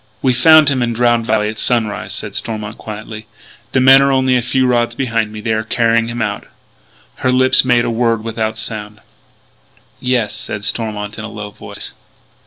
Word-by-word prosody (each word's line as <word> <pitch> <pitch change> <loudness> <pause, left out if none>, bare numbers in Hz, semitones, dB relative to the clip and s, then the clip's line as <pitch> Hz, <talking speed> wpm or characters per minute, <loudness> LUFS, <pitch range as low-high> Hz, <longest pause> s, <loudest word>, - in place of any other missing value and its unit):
"We 130 -2 +3
found 155 +4 +6
him 135 -3 0
in 120 -1 0
Drowned 120 -1 +1
Valley 110 -1 +1
at 110 +1 -5
sunrise," 110 -4 0
said - - -4
Stormont 110 -1 -5
quietly. 110 0 -8 0.4
"The 130 - +2
men 135 +1 +7
are 140 0 +2
only 130 -1 +2
a 125 - +2
few 130 +2 0
rods 120 -1 +1
behind 115 -5 -1
me. 110 0 -8
They 110 0 -1
are 110 - 0
carrying 115 0 +1
him 120 0 -3
out." 105 -1 -4 0.7
Her 130 - 0
lips 130 0 +5
made 125 -2 +2
a - - -1
word 115 -1 0
without 110 -1 -3
sound. 105 -1 -5 1.0
"Yes," 125 -4 0
said 105 -1 -5
Stormont 105 -2 -3
in - - -6
a 110 - -6
low 105 -2 -8
voice. - - -9
115 Hz, 190 wpm, -16 LUFS, 110-125 Hz, 1.0 s, men